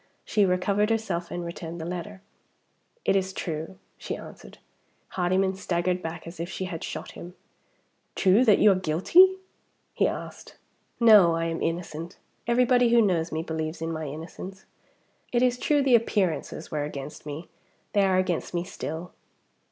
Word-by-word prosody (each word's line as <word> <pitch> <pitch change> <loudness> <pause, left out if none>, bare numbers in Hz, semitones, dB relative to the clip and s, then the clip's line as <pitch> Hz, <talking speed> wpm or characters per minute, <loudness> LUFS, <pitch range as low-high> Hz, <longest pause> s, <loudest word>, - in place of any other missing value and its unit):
She 205 -2 +2
recovered 200 +3 +1
herself, 195 -7 -1
and 175 0 -4
returned 170 0 -6
the 160 - -5
letter. 185 +3 -6 0.8
"It - - +3
is 190 -1 +1
true," 165 +1 -5 0.2
she - - -4
answered. - - -12 0.5
Hardyman 190 +1 +1
staggered 180 -1 -1
back 165 -1 -6
as 170 0 -10
if 170 +2 -4
she 190 - -4
had 170 -3 -6
shot - - -6
him. 175 +1 -10 0.8
"True 195 +5 +4
that 210 -4 +6
you 210 - +6
are - - +5
guilty?" 190 - +4 0.6
he - - +2
asked. - - -7 0.4
"No; 210 -8 +7
I 165 0 -1
am 165 0 -3
innocent. 165 0 -4 0.3
Everybody 245 0 +4
who 235 0 +5
knows 175 -6 +2
me 160 +1 -2
believes 160 0 -4
in 165 0 -3
my 160 -1 -4
innocence. 165 +6 -8 0.7
It 245 0 +2
is 250 -1 +2
true 290 +1 +2
the 265 -2 +3
appearances 200 -9 0
were 150 -1 -1
against 145 0 -7
me. 150 +3 -6 0.5
They 205 - +4
are 190 -1 +3
against 185 -1 -1
me 170 - 0
still." 170 -1 -6
180 Hz, 160 wpm, -26 LUFS, 165-205 Hz, 0.8 s, No